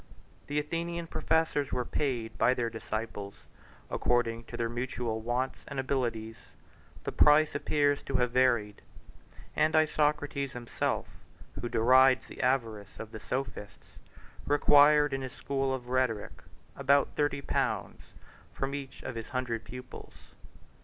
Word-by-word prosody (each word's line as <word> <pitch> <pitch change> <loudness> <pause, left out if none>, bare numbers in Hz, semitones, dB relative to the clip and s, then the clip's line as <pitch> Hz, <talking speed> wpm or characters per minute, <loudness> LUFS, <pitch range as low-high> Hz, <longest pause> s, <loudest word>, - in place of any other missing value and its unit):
The 145 - -2
Athenian 170 +3 -2
professors 160 -3 0
were 125 - -1
paid 120 -6 -2
by 125 - +4
their 115 -2 -1
disciples: 110 -2 -5 0.5
according 115 -1 0
to - - -8
their 115 - 0
mutual 120 -1 -3
wants 120 +3 -2
and 140 - -4
abilities, 115 -5 -2 0.7
the - - -3
price 150 +1 +5
appears 145 -1 +1
to 135 - -4
have 125 -1 +2
varied; 120 -5 +2 0.7
and 155 +1 +2
Isocrates 150 -3 +1
himself, 120 -1 -2 0.5
who 120 - -3
derides 130 +3 +5
the - - -8
avarice 115 -6 -1
of 110 -1 -7
the 110 - -7
sophists, 125 -3 -6 0.5
required, 145 0 +5
in 135 - -2
his 130 -1 -6
school 135 0 -1
of 125 -2 -4
rhetoric, 125 -5 -1 0.3
about 140 0 +3
thirty 145 -1 0
pounds - - -1 0.5
from 135 0 -3
each 140 -1 -7
of - - -4
his 115 -1 -6
hundred 125 -4 -2
pupils. 125 +2 -10
130 Hz, 130 wpm, -30 LUFS, 115-145 Hz, 0.7 s, price